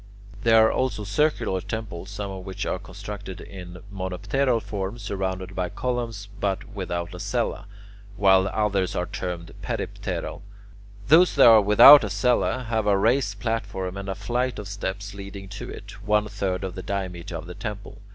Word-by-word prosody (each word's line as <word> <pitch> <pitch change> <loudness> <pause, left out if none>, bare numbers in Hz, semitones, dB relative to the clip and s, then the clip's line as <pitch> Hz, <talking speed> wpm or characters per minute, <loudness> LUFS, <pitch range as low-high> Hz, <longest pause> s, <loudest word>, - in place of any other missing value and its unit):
There 115 -1 +6
are - - +3
also 130 -5 -1
circular 100 -3 0
temples, 100 -5 -6
some 100 0 -5
of 95 -1 -7
which 95 0 -5
are 90 - -2
constructed 100 0 -8
in 90 -2 -10
monopteral 100 +7 0
form, 100 0 -4
surrounded 95 -3 -4
by 90 -1 -1
columns 115 -4 -3
but 100 0 -1
without 90 -2 -4
a 90 - -8
cella, - - -2 0.5
while 95 -1 +5
others 100 -3 0
are 90 - 0
termed 90 -3 -5
peripteral. - - -4 0.7
Those 175 +4 +6
that 140 - +7
are 115 -2 +9
without 105 +8 +9
a 105 - -2
cella 125 +5 +1
have 110 -2 0
a 100 -1 +4
raised 110 -1 +1
platform 100 -5 -3
and 100 0 -5
a 95 - -2
flight 120 +6 -1
of 105 - -6
steps 100 0 -5
leading 100 0 -8
to 100 - -7
it, - - -9
one 105 0 +2
third 100 -2 -2
of 95 -1 -4
the 95 - -6
diameter 90 -3 -4
of 80 +2 -6
the 90 - -8
temple. 105 +1 -7
100 Hz, 170 wpm, -25 LUFS, 95-110 Hz, 0.7 s, are